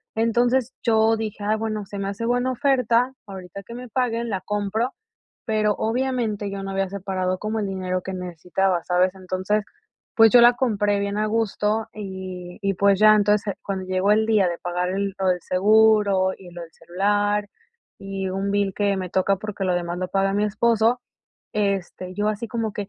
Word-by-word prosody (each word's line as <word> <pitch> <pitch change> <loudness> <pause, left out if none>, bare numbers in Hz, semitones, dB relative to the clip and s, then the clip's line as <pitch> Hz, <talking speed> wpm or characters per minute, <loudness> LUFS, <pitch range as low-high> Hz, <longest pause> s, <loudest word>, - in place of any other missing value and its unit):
Entonces, 240 +3 +1
yo 225 -1 +3
dije: 215 -1 -5
"Ah, 215 +1 +1
bueno, 215 -2 -3
se 200 +1 -7
me 195 - -2
hace 200 +3 -4
buena 245 +2 +1
oferta, 255 -2 +2
ahorita 190 0 -9
que 235 - -10
me 250 +1 -8
paguen 235 -1 -1
la 190 -3 -2
compro". 210 +5 -1 0.5
Pero, 215 -2 +1
obviamente, 225 -4 -1
yo 195 0 -5
no 195 - -5
había 195 0 -1
separado 185 -1 -2
como 215 +1 -2
el 205 - -2
dinero 185 -1 -2
que 190 - -6
necesitaba, 180 0 -1
¿sabes? 180 +1 +2
Entonces, 185 +3 -1 0.5
pues, 225 -1 +7
yo 245 - +8
la 240 +1 +8
compré 205 -5 +1
bien 200 +1 -2
a 215 - +1
gusto 215 0 0
y 185 -3 -7
y, 195 0 0
pues, 200 +1 +3
ya. 215 0 +7
Entonces, 210 0 +2
cuando 190 -2 -4
llegó 185 +2 +1
el 220 +1 +3
día 215 -4 +3
de 170 - -4
pagar 180 +1 -2
lo 195 0 -2
del 180 -1 0
seguro 200 0 +4
y 180 -2 -13
lo 175 0 -8
del 165 - -10
celular, 205 +3 0 0.5
y 195 -1 -4
un 195 +1 -2
bill 200 -1 0
que 200 -1 +1
me 185 -1 -4
toca 190 +2 +1
porque 205 -1 -5
lo 180 - +1
demás 175 0 -3
lo 185 - -2
paga 195 0 +1
mi 205 +1 +1
esposo, 230 +3 +2 0.5
este, 195 -3 -2
yo 205 +1 0
así 215 +2 -3
como 220 -2 -3
que, 205 -1 -4
205 Hz, 190 wpm, -23 LUFS, 190-220 Hz, 0.5 s, yo